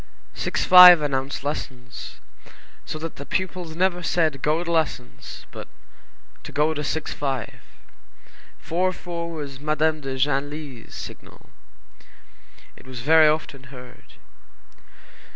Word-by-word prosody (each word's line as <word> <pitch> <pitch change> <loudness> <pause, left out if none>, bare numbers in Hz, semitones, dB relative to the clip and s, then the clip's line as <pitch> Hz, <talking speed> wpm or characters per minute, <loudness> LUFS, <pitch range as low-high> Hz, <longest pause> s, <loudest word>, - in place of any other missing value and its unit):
Six - - -2
five 180 -2 +10
announced 135 -1 -2
lessons, 125 -4 -7 0.7
so - - -4
that 160 +1 -7
the - - -7
pupils 180 -1 -3
never 180 0 +1
said 165 -2 +1
"to 135 - -11
go 155 +5 0
to 170 - -4
lessons," 155 -7 -3
but - - -9 0.7
"to - - -10
go 150 +2 +1
to 150 -1 -4
six 160 +1 -3
five." 135 -5 -4 1.0
Four 185 +3 -1
four 170 -2 -6
was 145 -5 -7
Madame 155 +1 0
de 135 -1 -5
Genlis's 140 -2 -3
signal. - - -11 1.2
It - - -17
was 130 -2 -8
very 155 +3 +6
often 150 -3 -2
heard. 125 -1 -14
150 Hz, 125 wpm, -23 LUFS, 135-165 Hz, 1.2 s, five